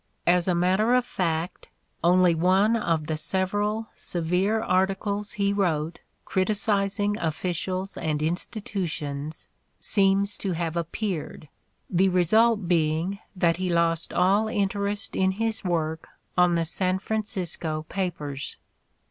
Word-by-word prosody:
As 175 0 +3
a 180 - +2
matter 190 +7 +3
of 250 -1 +2
fact, 170 -4 -3 0.3
"only 180 0 +5
one 190 +7 +3
of 165 -8 0
the 155 0 -2
several 205 +7 -1
severe 180 +6 0
articles 200 +1 0
he 200 -1 +1
wrote 165 -5 0 0.3
criticising 205 +1 0
offi 165 +3 -1
cials 185 +3 -3
and 155 -2 -1
institutions 155 -4 -3 0.3
seems 200 0 +3
to 190 -3 -2
have 165 -1 -2
appeared," 170 -3 -4 0.4
the 190 +1 +2
re 180 -1 +3
sult 220 +1 +3
being 165 +3 +1 0.2
that 170 -2 +2
he 185 0 -2
lost 170 -1 +1
all 200 +4 +3
interest 200 -1 -1
in 190 0 +2
his 225 +2 -1
work 160 -3 -2 0.3
on 180 -1 +4
the 165 -1 +1
San 185 +2 +1
Francisco 180 -7 -2
papers. 150 -8 -4
185 Hz, 125 wpm, -26 LUFS, 165-200 Hz, 0.4 s, only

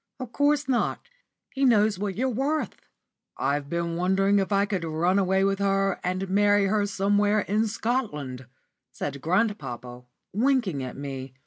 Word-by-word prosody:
"Of 255 -3 -6
course 290 +2 +1
not; 260 - -1 0.5
he 275 - -1
knows 215 -6 +4
what 200 -2 -2
you're 255 +4 0
worth." 275 +6 -2 0.5
"I've 140 +1 -1
been 170 0 -2
wondering 195 +3 +2
if 195 +1 -2
I 200 0 +3
could 195 -4 -3
run 170 +4 +1
away 190 0 +2
with 195 0 +1
her 195 -1 +1
and 185 +2 -2
marry 205 +1 +3
her 205 +1 +1
somewhere 205 +1 +2
in 215 +3 0
Scotland," 150 - -3 0.4
said 140 -1 -5
grandpapa, 140 - -2 0.3
winking 225 - +1
at 130 -1 -6
me. 135 -2 -6
195 Hz, 150 wpm, -26 LUFS, 170-215 Hz, 0.5 s, knows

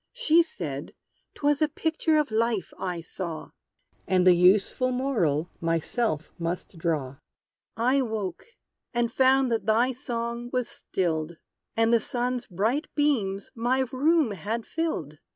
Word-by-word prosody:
She 340 -10 +4
said 470 +8 -5 0.4
'twas 290 0 +1
a 310 - +5
picture 315 +1 0
of 300 -5 +1
Life, 220 -3 0
I 180 -3 -3
saw; 165 -1 -6 0.6
And 185 -1 +3
the 180 - +8
useful 195 +8 +4
moral 195 - 0
myself 165 - -1
must 170 +2 -4
draw! 150 -6 -1 0.6
I 255 +4 +3
woke, 215 -7 -4 0.5
and 240 -1 +1
found 265 -1 +4
that 225 -2 -1
thy 235 +4 +3
song 235 -2 -4
was 250 -2 0
stilled, 165 -3 -2 0.4
And 225 +1 +3
the 235 - +6
sun's 245 +2 -2
bright 225 - 0
beams 260 -6 0
my 245 +2 +1
room 295 -1 +3
had 215 +4 -3
filled! 160 - -3
230 Hz, 135 wpm, -27 LUFS, 180-260 Hz, 0.6 s, the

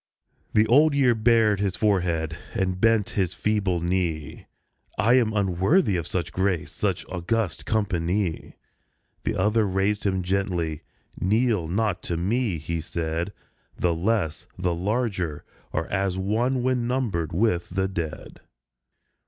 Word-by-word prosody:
The 110 0 +6
Old 145 +6 +5
Year 130 -4 +4
bared 110 -2 +3
his 100 -3 0
forehead, 85 -6 +1 0.2
and 95 -3 -1
bent 115 -3 +3
his 95 -3 -1
feeble 100 -5 0
knee. 85 -4 -2 0.3
" - - -37
I 110 +6 +4
am 120 -4 +4
unworthy 100 - +2
of 85 -3 -2
such 85 -4 -2
grace, 95 -3 0
such - - -2
august 90 - -2
company." 95 -4 -1 0.7
The - - 0
other 105 +2 +2
raised 95 +2 0
him 95 -2 0
gently. 90 -4 -1 0.4
"Kneel 105 -2 +2
not 100 +1 0
to 85 - 0
me," 105 +2 0
he 80 +2 -3
said; 85 +2 -3 0.5
"The 85 -1 +1
less, 90 -2 -1
the 90 -1 0
larger, 95 -4 -2 0.3
are 80 - -1
as 95 -2 0
one 120 +7 0
when 125 -2 +1
numbered 110 - -1
with 90 -1 +1
the 95 +1 0
dead. 85 -5 -5
95 Hz, 135 wpm, -25 LUFS, 85-110 Hz, 0.7 s, The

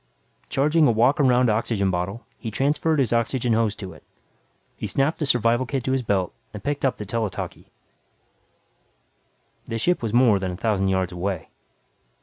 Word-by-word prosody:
Charging 150 +3 +3
a - - +4
walk 120 +6 +3
around 125 -2 +4
oxygen 105 -3 +1
bottle, 90 +6 -3
he 115 - -4
transferred 150 +7 +1
his 130 -5 +1
oxygen 115 +1 +1
hose 110 -2 +1
to 95 -4 -8
it. 80 - -16 0.7
He - - -5
snapped 135 - 0
the 150 - -1
survival 120 0 +2
kit 135 -2 -2
to 130 - -1
his 135 0 +1
belt 100 -6 0 0.2
and 105 - -8
picked 145 0 -2
up 135 - +1
the 105 - -6
tele 115 0 -1
talkie. - - -7 2.0
The 115 - -3
ship 175 +10 +1
was 115 -3 -2
more 120 -4 +4
than 95 -1 -2
a 90 - -5
thousand 100 -3 0
yards 95 -1 0
away. 90 -1 -3
115 Hz, 175 wpm, -24 LUFS, 100-130 Hz, 2.0 s, a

